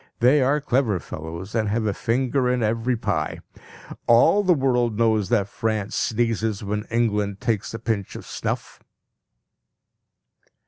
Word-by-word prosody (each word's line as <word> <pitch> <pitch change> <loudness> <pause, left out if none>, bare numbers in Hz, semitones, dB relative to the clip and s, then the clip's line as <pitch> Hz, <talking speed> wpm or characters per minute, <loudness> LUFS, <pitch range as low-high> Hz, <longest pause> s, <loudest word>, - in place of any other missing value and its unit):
They 130 +5 +5
are 140 +3 +2
clever 125 -8 +1
fellows, 85 +6 -7
and 110 -3 0
have 110 +1 0
a 105 - +1
finger 125 +4 0
in 125 -1 +1
every 115 +3 0
pie. 105 -9 -2 0.7
All 120 - +5
the 185 -3 +3
world 125 -5 +1
knows 110 -3 +2
that 105 -5 +2
France 110 -1 -2
sneezes 110 -2 0
when 105 +2 -3
England 105 -4 0
takes 110 -4 -1
a - - -3
pinch 110 -4 -3
of - - -8
snuff. - - -4
115 Hz, 140 wpm, -23 LUFS, 105-125 Hz, 0.7 s, They